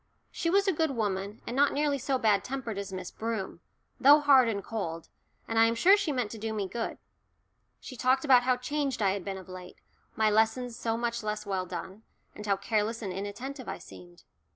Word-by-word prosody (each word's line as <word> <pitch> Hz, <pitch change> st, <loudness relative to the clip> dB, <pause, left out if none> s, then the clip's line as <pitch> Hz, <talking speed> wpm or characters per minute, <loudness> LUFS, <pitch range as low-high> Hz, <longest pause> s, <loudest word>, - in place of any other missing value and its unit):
She 335 Hz, -, -2 dB
was 395 Hz, +3 st, +3 dB
a 385 Hz, -, +3 dB
good 320 Hz, 0 st, +1 dB
woman, 205 Hz, -4 st, -3 dB
and 240 Hz, -, -4 dB
not 285 Hz, +1 st, +3 dB
nearly 290 Hz, -1 st, +1 dB
so 270 Hz, +1 st, 0 dB
bad 210 Hz, -5 st, +2 dB
tempered 250 Hz, -6 st, -4 dB
as 200 Hz, -1 st, -6 dB
Miss 185 Hz, -1 st, -6 dB
Broom, 220 Hz, -6 st, -4 dB, 0.4 s
though 285 Hz, +3 st, +8 dB
hard 275 Hz, -5 st, +5 dB
and 200 Hz, -3 st, -3 dB
cold, 165 Hz, -8 st, -5 dB, 0.4 s
and 225 Hz, 0 st, 0 dB
I 225 Hz, -, +7 dB
am 230 Hz, -, 0 dB
sure 370 Hz, +12 st, +6 dB
she 405 Hz, -7 st, -1 dB
meant 250 Hz, -6 st, -2 dB
to 225 Hz, -, -7 dB
do 220 Hz, +1 st, -3 dB
me 205 Hz, -3 st, -2 dB
good. 230 Hz, +4 st, -4 dB, 0.8 s
She 255 Hz, -, -9 dB
talked 260 Hz, +3 st, +2 dB
about 255 Hz, -3 st, +7 dB
how 250 Hz, 0 st, +2 dB
changed 275 Hz, -2 st, -2 dB
I 195 Hz, -, +3 dB
had 195 Hz, -1 st, -3 dB
been 195 Hz, 0 st, -4 dB
of 190 Hz, -, -11 dB
late, 185 Hz, -1 st, -10 dB, 0.4 s
my 215 Hz, -1 st, +3 dB
lessons 225 Hz, +3 st, +1 dB
so 230 Hz, -1 st, -2 dB
much 235 Hz, 0 st, -2 dB
less 210 Hz, 0 st, -3 dB
well 190 Hz, -2 st, -2 dB
done, 185 Hz, +3 st, -7 dB, 0.3 s
and 210 Hz, -, -9 dB
how 200 Hz, -1 st, +2 dB
careless 220 Hz, +3 st, -1 dB
and 190 Hz, -3 st, -3 dB
inattentive 225 Hz, +8 st, -6 dB
I -, -, -4 dB
seemed. 90 Hz, -2 st, -14 dB
225 Hz, 215 wpm, -29 LUFS, 200-260 Hz, 0.8 s, though